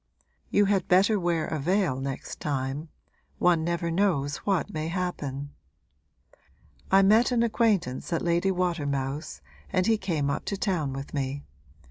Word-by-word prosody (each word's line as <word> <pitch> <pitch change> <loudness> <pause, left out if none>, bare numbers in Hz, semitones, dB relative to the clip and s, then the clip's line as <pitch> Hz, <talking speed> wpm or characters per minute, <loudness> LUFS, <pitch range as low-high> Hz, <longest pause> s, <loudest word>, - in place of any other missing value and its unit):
You 205 - +4
had 195 -3 +1
better 195 +4 +4
wear 170 -3 0
a 155 - -3
veil 175 -3 +1
next 135 0 -5
time 140 +2 -3 0.5
one 175 -2 +3
never 170 0 -1
knows 165 -7 +1
what 190 -7 -1
may 155 0 -2
happen. 145 -6 -3 1.4
I 195 +1 +6
met 220 +6 +5
an 235 -1 +3
acquaintance 210 - 0
at 165 - 0
Lady 175 +2 +2
Watermouth's 145 - -2 0.3
and 185 - +1
he 225 0 +2
came 160 -8 -1
up - - -3
to 200 - -2
town 175 - -1
with 135 +1 -7
me. 140 0 -2
170 Hz, 145 wpm, -27 LUFS, 140-195 Hz, 1.4 s, I